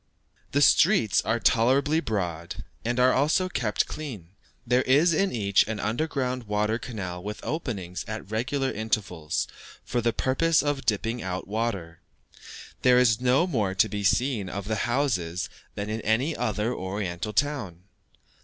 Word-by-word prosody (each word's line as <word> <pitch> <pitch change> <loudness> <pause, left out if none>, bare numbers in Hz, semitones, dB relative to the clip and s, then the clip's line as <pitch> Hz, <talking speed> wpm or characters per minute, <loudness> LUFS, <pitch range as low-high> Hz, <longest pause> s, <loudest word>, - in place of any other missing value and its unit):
The 145 +1 +3
streets 170 - +4
are 115 - +1
tolerably 135 +8 +3
broad, 85 - -3 0.2
and 120 +2 -1
are 125 +1 +5
also 155 +7 +2
kept 120 -12 0
clean, 115 - -7 0.4
there 125 +1 +3
is 150 +7 +4
in 195 +4 +1
each 100 -4 +2
an 110 -1 -3
underground 125 0 -2
water 105 +2 0
canal 100 -7 -6
with 105 +2 -6
openings 100 - -4
at 110 -2 -6
regular 130 +4 -1
intervals 100 -8 -2 0.4
for 120 - -1
the 115 0 +2
purpose 150 +8 +2
of 145 -2 -2
dipping 115 +2 0
out 95 -1 -4
water. 100 -6 -3 0.8
There 125 -1 +5
is 125 -2 +4
no 130 +6 +3
more 105 - -1
to 100 - +4
be 105 -1 -4
seen 110 -1 +1
of 100 +2 -5
the 110 +2 -1
houses 100 -10 -1 0.2
than 100 0 -4
in 110 +1 -3
any 125 +10 +1
other 110 +3 -1
Oriental 95 0 -4
town. 105 - -1
115 Hz, 150 wpm, -26 LUFS, 100-130 Hz, 0.8 s, are